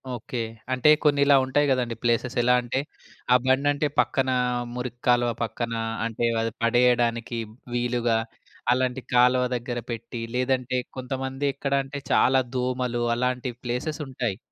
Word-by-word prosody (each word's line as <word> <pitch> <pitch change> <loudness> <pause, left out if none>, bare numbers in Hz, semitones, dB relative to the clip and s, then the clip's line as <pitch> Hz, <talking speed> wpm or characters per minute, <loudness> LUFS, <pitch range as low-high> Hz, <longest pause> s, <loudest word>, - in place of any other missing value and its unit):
Okay. 120 +1 -6 0.4
అంటే 130 +3 +4
కొన్నిలా 140 -1 +5
ఉంటాయి 145 +3 +2
గదండీ. 125 -3 0
ప్లేసెస్ 120 +2 0
ఎలా 125 +1 +4
అంటే, 120 +2 -2 0.5
ఆ - - +8
బండంటే 140 +3 +2
పక్కనా 130 -1 +2 0.4
మురికి 125 -1 -5
కాలువ 120 -1 +4
పక్కన 115 +1 -3 0.3
అంటే, 115 +1 -1 0.2
అది 115 - -1
పడేయడానికి 120 -1 +2 0.4
వీలుగా 120 -1 +1 0.6
అలాంటి 130 0 -1
కాలువ 125 +1 +5
దగ్గర 120 0 -3
పెట్టి, 115 0 -6
లేదంటే 125 0 0 0.2
కొంతమంది 135 +2 -3
ఎక్కడంటే 140 0 -2
చాలా 130 +1 +4
దోమలు 125 -1 -1
అలాంటి 125 +1 -1
ప్లేసెసుంటాయి. 125 -3 -3
125 Hz, 120 wpm, -25 LUFS, 120-130 Hz, 0.6 s, ఆ